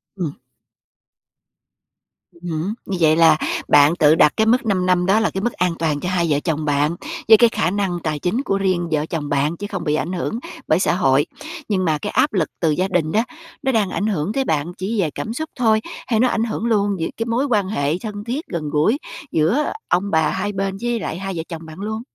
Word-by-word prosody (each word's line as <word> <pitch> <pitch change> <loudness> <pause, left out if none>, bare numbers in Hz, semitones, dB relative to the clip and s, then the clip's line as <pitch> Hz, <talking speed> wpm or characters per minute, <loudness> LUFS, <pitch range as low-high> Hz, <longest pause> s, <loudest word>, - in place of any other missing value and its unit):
Ừm. 170 -7 -3 2.0
Ừm 175 +1 -9
hứm. 160 +6 -2
Như 195 - -3
vậy 155 -1 +5
là 160 -1 +6 0.3
bạn 145 +3 +6
tự 155 -2 +5
đặt 150 - +5
cái 220 - +3
mức 245 +3 +3
5 190 -4 +1
năm 180 -1 +2
đó 195 +4 +4
là 220 - +1
cái 190 - -4
mức 240 - 0
an 180 -2 0
toàn 155 -3 0
cho 180 - -3
hai 180 -2 +1
vợ 145 -1 +2
chồng 155 -1 -2
bạn, 145 +2 +1 0.3
với 220 - +9
cái 235 +1 +5
khả 180 - 0
năng 195 -3 -1
tài 155 -2 -2
chính 180 - 0
của 195 - 0
riêng 185 -3 0
vợ 155 -1 +1
chồng 155 -3 -4
bạn, 145 +4 0
chứ 205 - -5
không 190 -5 -4
bị 150 -2 +1
ảnh 175 +4 -2
hưởng 185 +5 -2 0.3
bởi 155 - +3
xã 190 - +2
hội. 140 -5 +3 0.4
Nhưng 190 -3 +1
mà 155 -2 +2
cái 205 - -5
áp 275 +4 +2
lực 180 -6 +1
từ 165 -3 +2
gia 185 +5 0
đình 175 -5 0
đó, 220 +5 +2 0.4
nó 265 - +2
đang 215 -6 +1
ảnh 205 - -1
hưởng 195 -1 -1
tới 270 - +1
bạn 160 - -1
chỉ 205 +4 -2
về 165 - 0
cảm 220 - -4
xúc 315 +6 -4
thôi, 220 -3 +3 0.3
hay 225 -3 +1
nó 250 - +4
ảnh 225 -2 0
hưởng 225 0 -3
luôn 205 -3 +2
về 165 - -1
cái 225 - -2
mối 235 +4 0
quan 210 -8 +1
hệ 150 -5 0
thân 210 -2 -6
thiết, 255 +8 -4
gần 155 -3 -4
gũi 155 - +2 0.3
giữa 185 - +1 0.2
ông 190 +3 0
bà 160 -1 +3
hai 205 - -2
bên 195 -1 -2
với 240 -1 -1
lại 170 - -4
hai 195 0 -4
vợ 165 - -3
chồng 165 -1 -7
bạn 160 +2 -11
luôn? 220 +2 -4
185 Hz, 240 wpm, -20 LUFS, 160-215 Hz, 2.0 s, với